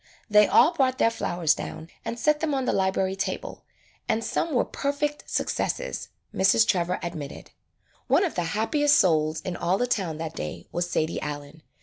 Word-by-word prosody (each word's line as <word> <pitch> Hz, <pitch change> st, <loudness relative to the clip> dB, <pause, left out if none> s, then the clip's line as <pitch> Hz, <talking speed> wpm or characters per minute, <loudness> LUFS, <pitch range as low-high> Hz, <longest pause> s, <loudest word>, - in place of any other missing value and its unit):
They 210 Hz, -1 st, +6 dB
all 340 Hz, -, +5 dB
brought 260 Hz, -4 st, +1 dB
their 230 Hz, -, +3 dB
flowers 175 Hz, -8 st, +1 dB
down 160 Hz, -, -7 dB, 0.2 s
and 235 Hz, -, -4 dB
set 300 Hz, +4 st, +2 dB
them 300 Hz, -3 st, 0 dB
on 265 Hz, -1 st, -1 dB
the -, -, +1 dB
library 190 Hz, 0 st, +1 dB
table, 195 Hz, -, -4 dB, 0.4 s
and 225 Hz, -, +1 dB
some 330 Hz, -, -1 dB
were 250 Hz, -, +2 dB
per 280 Hz, -, -2 dB
fect 295 Hz, +1 st, -3 dB
successes, -, -, -2 dB, 0.2 s
Mrs. 195 Hz, +4 st, +4 dB
Trevor 180 Hz, -1 st, +1 dB
admitted. 160 Hz, -5 st, -6 dB, 0.6 s
One -, -, +4 dB
of 360 Hz, -, -1 dB
the 175 Hz, -, -1 dB
happiest 290 Hz, +6 st, +3 dB
souls 155 Hz, -3 st, +2 dB
in 185 Hz, -, -4 dB
all 180 Hz, +2 st, 0 dB
the 245 Hz, -, +1 dB
town 185 Hz, -10 st, -1 dB
that 160 Hz, -1 st, -5 dB
day 75 Hz, -, -6 dB
was 175 Hz, 0 st, -2 dB
Sadie 160 Hz, -1 st, -1 dB
Allen. 145 Hz, +1 st, -6 dB
190 Hz, 185 wpm, -26 LUFS, 165-265 Hz, 0.6 s, They